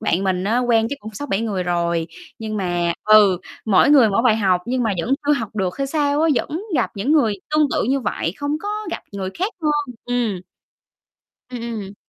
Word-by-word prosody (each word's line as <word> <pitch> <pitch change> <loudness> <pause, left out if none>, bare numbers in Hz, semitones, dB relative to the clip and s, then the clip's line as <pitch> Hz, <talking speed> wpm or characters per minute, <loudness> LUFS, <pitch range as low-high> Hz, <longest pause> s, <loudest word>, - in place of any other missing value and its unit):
bạn 180 +4 0
mình 185 -1 0
á, 225 +4 +1
quen 235 -3 +2
chắc 285 - -3
cũng 215 -1 -9
6-7 215 -5 -2
người 205 -5 -2
rồi, 170 -2 0 0.3
nhưng 215 -1 -4
mà 175 -3 0
ừ, 210 -4 +6 0.3
mỗi 215 +6 +4
người 265 -6 +7
mỗi 200 +3 +1
bài 235 -3 +4
học 190 -4 +2
nhưng 250 +1 0
mà 220 -3 +1
vẫn 255 +10 +1
chưa 295 - +4
học 225 -5 -3
được 190 +3 -2
hay 275 - 0
sao 290 0 +1
á. 325 - +3
Vẫn 315 - -2
gặp 245 - +1
những 225 +9 0
người 235 -10 +3 0.2
tương 305 0 +3
tự - - +1
như 270 +3 +1
vậy, 170 -7 -2
không 285 0 -2
có 410 - -5 0.2
gặp - - -5
người 190 -1 -4
khác 390 +6 -1
hơn. 295 -4 0
Ừm. 235 -7 -1 1.1
Ừm, 250 -1 -6 0.2
ừm. 195 0 -9
225 Hz, 215 wpm, -21 LUFS, 195-275 Hz, 1.1 s, người